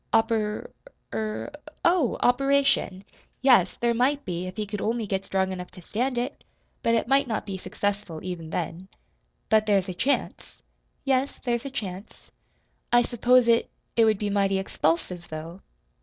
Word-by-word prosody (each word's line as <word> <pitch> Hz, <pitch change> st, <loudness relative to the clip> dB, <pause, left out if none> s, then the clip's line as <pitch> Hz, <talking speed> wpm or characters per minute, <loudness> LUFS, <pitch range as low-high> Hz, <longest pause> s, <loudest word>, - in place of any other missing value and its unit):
"Oper 225 Hz, -2 st, +1 dB, 0.4 s
er 215 Hz, +5 st, -3 dB, 0.3 s
oh, 340 Hz, -8 st, +3 dB
operation! 275 Hz, -6 st, +2 dB, 0.4 s
Yes, 240 Hz, -9 st, +5 dB
there 235 Hz, 0 st, +1 dB
might 275 Hz, +5 st, +1 dB
be, 180 Hz, 0 st, -3 dB
if 185 Hz, -, -8 dB
he 215 Hz, -, -1 dB
could 205 Hz, 0 st, -5 dB
only 230 Hz, 0 st, 0 dB
get 195 Hz, -1 st, -2 dB
strong 190 Hz, 0 st, 0 dB
enough 180 Hz, -1 st, -6 dB
to 180 Hz, -, -13 dB
stand 245 Hz, +7 st, -1 dB
it. 245 Hz, +1 st, -3 dB, 0.4 s
But 230 Hz, 0 st, +3 dB
it 230 Hz, -, 0 dB
might 275 Hz, +1 st, +3 dB
not 220 Hz, -3 st, -2 dB
be 195 Hz, -, -4 dB
successful, 200 Hz, -2 st, -3 dB
even 175 Hz, -3 st, -5 dB
then." 175 Hz, +2 st, -4 dB, 0.6 s
"But 215 Hz, -1 st, +3 dB
there's 195 Hz, -2 st, +2 dB
a -, -, -3 dB
chance?" 265 Hz, +11 st, -2 dB, 0.4 s
"Yes, 270 Hz, 0 st, +1 dB
there's 240 Hz, +1 st, 0 dB
a -, -, -3 dB
chance." 200 Hz, -6 st, -7 dB, 0.6 s
"I 240 Hz, 0 st, +6 dB
s'pose 245 Hz, +1 st, +3 dB
it 230 Hz, 0 st, +3 dB, 0.3 s
it 230 Hz, -, +5 dB
would 215 Hz, -2 st, +3 dB
be 205 Hz, 0 st, -2 dB
mighty 195 Hz, -1 st, +2 dB
expulsive, 175 Hz, -1 st, -1 dB
though." 165 Hz, +4 st, -7 dB
215 Hz, 160 wpm, -26 LUFS, 190-245 Hz, 0.6 s, I